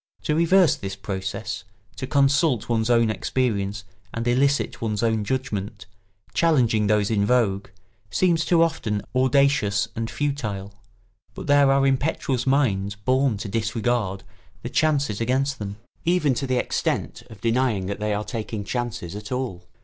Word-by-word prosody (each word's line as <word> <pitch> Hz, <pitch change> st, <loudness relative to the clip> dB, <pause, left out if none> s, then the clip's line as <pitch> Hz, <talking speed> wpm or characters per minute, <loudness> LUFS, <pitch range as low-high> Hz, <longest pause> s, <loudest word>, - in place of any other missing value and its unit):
To 150 Hz, -, 0 dB
reverse 170 Hz, +2 st, +4 dB
this 95 Hz, -1 st, -5 dB
process, 100 Hz, +1 st, -4 dB, 0.3 s
to 130 Hz, -, -4 dB
consult 140 Hz, -2 st, +2 dB
one's 115 Hz, -1 st, 0 dB
own 115 Hz, -2 st, +4 dB
experience 105 Hz, -4 st, -1 dB, 0.3 s
and 115 Hz, +1 st, -3 dB
elicit 140 Hz, +3 st, +1 dB
one's 110 Hz, -1 st, -1 dB
own 110 Hz, -2 st, +1 dB
judgment, 105 Hz, -4 st, -3 dB, 0.5 s
challenging 120 Hz, -10 st, +3 dB
those 105 Hz, 0 st, +2 dB
in 105 Hz, -2 st, +2 dB
vogue, 100 Hz, -4 st, +1 dB, 0.4 s
seems 170 Hz, -, +2 dB
too 170 Hz, -1 st, +4 dB
often 110 Hz, -10 st, -1 dB
audacious 130 Hz, -6 st, +2 dB
and 115 Hz, 0 st, -3 dB
futile; 105 Hz, -9 st, -3 dB, 0.6 s
but -, -, -7 dB
there 145 Hz, -2 st, +5 dB
are 135 Hz, 0 st, +3 dB
impetuous 135 Hz, -2 st, 0 dB
minds 105 Hz, -8 st, +1 dB
born 130 Hz, +3 st, +1 dB
to 105 Hz, -, -5 dB
disregard 110 Hz, -2 st, -1 dB, 0.4 s
the -, -, -4 dB
chances 140 Hz, -9 st, +1 dB
against 135 Hz, +3 st, 0 dB
them, 100 Hz, -1 st, -5 dB, 0.3 s
even 170 Hz, -5 st, +2 dB
to 135 Hz, +2 st, -3 dB
the 130 Hz, -1 st, +1 dB
extent -, -, -1 dB
of 110 Hz, -, -12 dB
denying 115 Hz, -4 st, +1 dB
that 100 Hz, +2 st, -4 dB
they 105 Hz, 0 st, -1 dB
are 105 Hz, +1 st, -1 dB
taking 110 Hz, -3 st, -4 dB
chances 120 Hz, -5 st, -4 dB
at 105 Hz, +2 st, -8 dB
all. 125 Hz, -8 st, -4 dB
115 Hz, 150 wpm, -24 LUFS, 105-135 Hz, 0.6 s, there